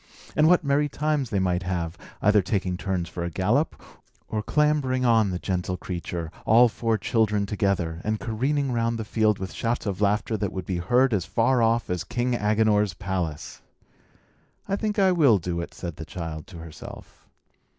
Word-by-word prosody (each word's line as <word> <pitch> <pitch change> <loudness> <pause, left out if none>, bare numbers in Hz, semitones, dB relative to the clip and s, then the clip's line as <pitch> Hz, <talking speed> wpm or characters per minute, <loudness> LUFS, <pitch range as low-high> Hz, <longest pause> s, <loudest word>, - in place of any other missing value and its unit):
And 155 - +5
what 180 0 +5
merry 145 +1 +2
times 150 -3 -1
they 100 - -1
might 90 -1 +1
have, 85 -3 -3 0.3
either 105 0 +5
taking 95 -1 -1
turns 90 -2 -2
for 85 - -5
a 85 - -2
gallop, 105 - 0 0.5
or 110 - -2
clambering 140 -1 +1
on 115 -4 +4
the 90 - -2
gentle 90 0 -2
creature, 85 -3 -5
all 120 +2 +6
four 115 0 0
children 105 -3 +1
together, 95 -5 -1
and 110 0 -1
careering 135 +5 -1
round 115 -1 0
the 110 - -4
field 110 -1 +2
with 95 0 -6
shouts 120 +1 -2
of 100 -1 -3
laughter 105 +2 +1
that 100 -2 -2
would 95 -1 -5
be 90 - -2
heard 120 +8 +2
as 95 -5 0
far 120 +2 +2
off 115 +1 +2
as 90 -1 -2
King 120 +6 -1
Agenor's 105 -3 +2
palace! 90 -5 -4 1.1
"I 195 - 0
think 210 0 -2
I 190 -2 +4
will 145 - +5
do 85 -1 -3
it," 85 - -7
said 85 -3 -7
the - - -6
child 80 -3 -6
to 90 - -11
herself. 80 -2 -11
105 Hz, 180 wpm, -25 LUFS, 90-120 Hz, 1.1 s, all